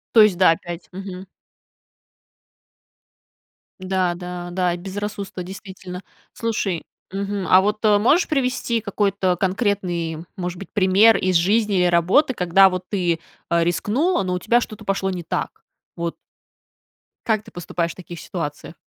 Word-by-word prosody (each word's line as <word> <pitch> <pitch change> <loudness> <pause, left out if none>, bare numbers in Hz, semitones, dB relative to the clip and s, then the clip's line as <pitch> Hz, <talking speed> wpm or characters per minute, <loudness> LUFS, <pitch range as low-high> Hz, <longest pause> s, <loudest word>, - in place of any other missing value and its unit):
То 220 - +9
есть, 205 -5 +5
да, 185 -3 +6
опять, 170 +1 -5
мгм. 190 0 -7 2.5
Да 185 -1 0
да 180 0 -6
да, 180 -1 +1
и - - -4
безрассудство, 200 0 -5
действительно. 185 -1 -8 0.3
Слушай, 205 -6 -2 0.3
мгм. 200 0 -3
А 185 +1 +7
вот, 210 +2 -1
э, 210 -1 +5
можешь 295 - +3
привести 255 -5 0
какой-то 200 -3 0
конкретный, 180 -4 -1
может 180 -1 -4
быть, 195 - -9
пример 200 +2 +5
из 185 -1 0
жизни 205 +4 +3
или 180 - +3
работы, 180 - +3
когда 190 +1 +5
вот 185 0 -4
ты, 175 -5 0 0.3
э, 170 0 +3
рискнула, 220 - +1
но 180 -1 -2
у 180 - -1
тебя 235 +5 +3
что-то 215 - -7
пошло 195 -1 0
не 180 -2 -4
так? - - -4 0.4
Вот 170 0 -3 1.1
как 220 -3 +2
ты 220 - -15
поступаешь 170 -2 -3
в - - -29
таких 175 -2 -9
ситуациях? 155 -2 -6
190 Hz, 145 wpm, -22 LUFS, 175-205 Hz, 2.5 s, То